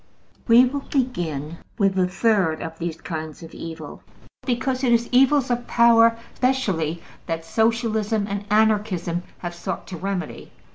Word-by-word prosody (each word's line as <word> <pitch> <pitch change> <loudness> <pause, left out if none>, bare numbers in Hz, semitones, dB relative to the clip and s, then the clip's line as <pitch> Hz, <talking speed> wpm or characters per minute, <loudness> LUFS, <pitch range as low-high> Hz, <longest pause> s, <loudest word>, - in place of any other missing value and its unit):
We 240 +2 +7
will 275 +3 -2
begin 170 - -2 0.2
with 195 -2 +2
the 185 -1 +2
third 185 -5 +1
of 165 0 -7
these 165 -1 -4
kinds 160 -1 -6
of 165 - -11
evil, 160 -2 -8 0.5
because 255 +1 -1
it 250 - +3
is 235 0 +3
evils 265 +1 +4
of 240 0 -2
power 230 -1 +5 0.2
specially 190 -12 0 0.2
that 165 0 -3
Socialism 220 +1 +1
and 200 0 -3
Anarchism 210 -5 +1 0.2
have 175 0 -4
sought 170 - -5
to 185 - -6
remedy. 185 -1 -4
205 Hz, 145 wpm, -23 LUFS, 165-235 Hz, 0.5 s, We